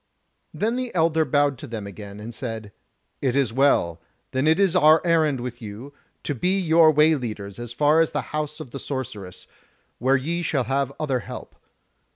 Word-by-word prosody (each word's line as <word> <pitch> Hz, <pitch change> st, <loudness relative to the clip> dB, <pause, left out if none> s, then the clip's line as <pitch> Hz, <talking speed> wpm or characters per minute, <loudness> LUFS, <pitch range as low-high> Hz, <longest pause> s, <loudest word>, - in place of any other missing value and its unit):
Then 230 Hz, +4 st, -1 dB
the 255 Hz, -2 st, -3 dB
elder 160 Hz, -1 st, +3 dB
bowed 145 Hz, -1 st, +1 dB
to -, -, -8 dB
them 110 Hz, -3 st, -6 dB
again, 100 Hz, 0 st, -9 dB
and 115 Hz, +3 st, -8 dB
said: 110 Hz, -3 st, -6 dB, 0.5 s
"It 130 Hz, -2 st, 0 dB
is 135 Hz, -5 st, +1 dB
well; 115 Hz, -, +2 dB, 0.3 s
then 130 Hz, +3 st, 0 dB
is 160 Hz, -, +5 dB
this 190 Hz, -1 st, +2 dB
our 155 Hz, -2 st, +6 dB
errand 160 Hz, -5 st, +2 dB
with 120 Hz, 0 st, -6 dB
you, 110 Hz, +6 st, -8 dB, 0.3 s
to 145 Hz, -, -2 dB
be 180 Hz, +9 st, 0 dB
your 165 Hz, -2 st, +5 dB
way 155 Hz, +1 st, +5 dB
leaders 105 Hz, -8 st, -5 dB
as 120 Hz, -1 st, -6 dB
far 150 Hz, +6 st, +3 dB
as 165 Hz, -, +2 dB
the -, -, -2 dB
House 150 Hz, 0 st, -3 dB
of 145 Hz, -6 st, -9 dB
the 140 Hz, -, -6 dB
Sorceress, 120 Hz, -10 st, -6 dB, 0.5 s
where 130 Hz, +3 st, +3 dB
ye 165 Hz, +6 st, -2 dB
shall 150 Hz, -5 st, 0 dB
have 135 Hz, +1 st, -1 dB
other 135 Hz, -5 st, 0 dB
help. -, -, -9 dB
140 Hz, 190 wpm, -24 LUFS, 120-155 Hz, 0.5 s, our